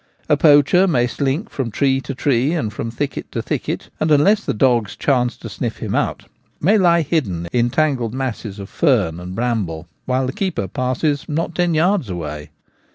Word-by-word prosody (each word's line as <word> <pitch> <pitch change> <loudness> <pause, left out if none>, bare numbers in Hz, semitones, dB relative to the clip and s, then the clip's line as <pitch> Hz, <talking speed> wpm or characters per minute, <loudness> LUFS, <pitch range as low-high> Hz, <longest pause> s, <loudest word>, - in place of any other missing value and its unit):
A 150 - +4
poacher 150 +5 +5
may 125 -9 +2
slink 140 - -2
from 130 -4 -3
tree 135 +3 +1
to 135 +1 -6
tree 135 +2 +1
and 115 -11 -2
from 115 - -4
thicket 140 +5 -4
to - - -2
thicket* - - -3
and, 155 - +1
unless 195 +9 +4
the - - -1
dogs 120 -3 +2
chance 125 -4 +1
to - - -9
sniff - - -4
him - - -4
out, - - -1 0.3
may 205 +7 +3
lie 170 -3 +4
hidden 105 - -1
in 120 0 +2
tangled 130 -5 0
masses 120 -6 -4
of 100 -1 -7
fern 80 -2 +1
and 90 +1 -7
bramble, 100 -9 -2 0.2
while 130 +1 0
the 130 - -3
keeper 180 - -2
passes 130 - -1
not 165 +3 -2
ten 175 -1 +1
yards 170 - +2
away. 75 -4 -5
130 Hz, 185 wpm, -19 LUFS, 115-155 Hz, 0.3 s, poacher